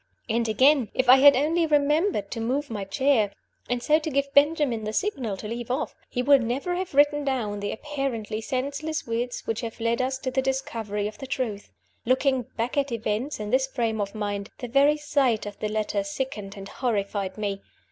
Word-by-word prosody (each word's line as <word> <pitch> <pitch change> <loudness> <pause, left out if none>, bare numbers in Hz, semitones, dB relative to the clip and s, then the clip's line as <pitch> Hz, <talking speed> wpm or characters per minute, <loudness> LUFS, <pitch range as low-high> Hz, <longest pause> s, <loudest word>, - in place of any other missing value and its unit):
And, 230 +1 0
again, 260 +1 +4
if 260 - +1
I 255 +2 +9
had 280 +1 +8
only 320 +5 +2
remembered 295 - +2
to 230 - -4
move 265 +4 -1
my 205 -3 -3
chair, 225 -1 +2 0.4
and 245 -1 -1
so 305 +1 +4
to 315 - -4
give 280 -1 -1
Benjamin 285 -6 +3
the 215 0 -3
signal 255 - -1
to 210 - -7
leave 235 +2 -5
off, 255 - -1 0.2
he 250 - -1
would 280 0 +6
never 255 +9 -2
have 360 -4 -4
written 290 +1 +4
down 235 -7 -1
the 205 0 -3
apparently 240 -6 -3
senseless 280 +6 -3
words 240 +1 -3
which 225 0 -2
have 230 0 -6
led 230 +2 +1
us 260 +1 -1
to 260 0 -4
the 265 +1 +1
discovery 230 -6 -2
of 210 - -9
the 270 - -7
truth. 235 -6 -3 0.3
Looking 255 0 +1
back 235 +5 -2
at 280 -2 +1
events 230 +4 -2
in 210 0 -4
this 265 +1 +3
frame 230 -5 -1
of 200 +1 -4
mind, 205 -1 -3
the 245 - -5
very 280 +4 +4
sight 275 -7 +1
of 205 -1 -8
the 215 - -2
letter 210 -1 -1
sickened 205 -2 -5
and 195 0 -8
horrified 200 -5 -2
me. 200 -2 -3
250 Hz, 200 wpm, -26 LUFS, 215-280 Hz, 0.4 s, I